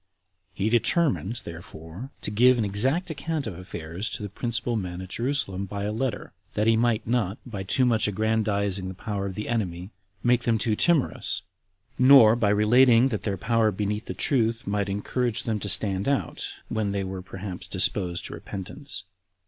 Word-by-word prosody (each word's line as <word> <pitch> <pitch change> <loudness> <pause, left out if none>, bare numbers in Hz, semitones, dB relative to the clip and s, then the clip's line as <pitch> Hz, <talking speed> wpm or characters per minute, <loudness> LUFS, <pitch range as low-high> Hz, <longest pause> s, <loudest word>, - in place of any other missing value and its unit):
He 100 +3 0
determined, 120 - +1
therefore, 85 +6 -9
to - - -3
give 125 +4 +5
an 115 - +1
exact 135 - +1
account 160 -1 -3
of 105 -6 -5
affairs 90 +2 -6
to - - -4
the 105 - -4
principal 120 +3 -2
men 90 -4 -4
at 95 -1 -8
Jerusalem 115 -6 -1
by 100 +1 -5
a 105 - -1
letter, 120 +1 -3 0.2
that 105 - +1
he 115 0 +5
might 115 -1 +1
not, 115 -4 0
by 110 -6 -6
too 115 +7 +2
much 115 -4 +3
aggrandizing 100 -2 0
the 95 - -6
power 100 -1 -3
of 95 - -6
the 105 - -4
enemy, 95 -5 -2 0.3
make 120 0 +3
them 115 -1 +3
too 110 0 0
timorous; 165 +2 +1 0.6
nor, 125 -4 +8
by 110 -4 +1
relating 115 +4 +5
that 110 -5 -3
their 100 -3 -2
power 115 +3 +2
beneath 105 +2 -2
the - - -5
truth, 115 -4 +1
might 100 0 -1
encourage 110 +4 -1
them 110 -2 -1
to 100 - -4
stand 95 +1 +1
out 140 -2 -1 0.2
when 110 -3 -1
they 100 -1 -1
were 95 0 -5
perhaps 95 0 -7
disposed 90 -3 0
to - - -6
repentance. 100 +2 -7
105 Hz, 180 wpm, -26 LUFS, 95-120 Hz, 0.6 s, nor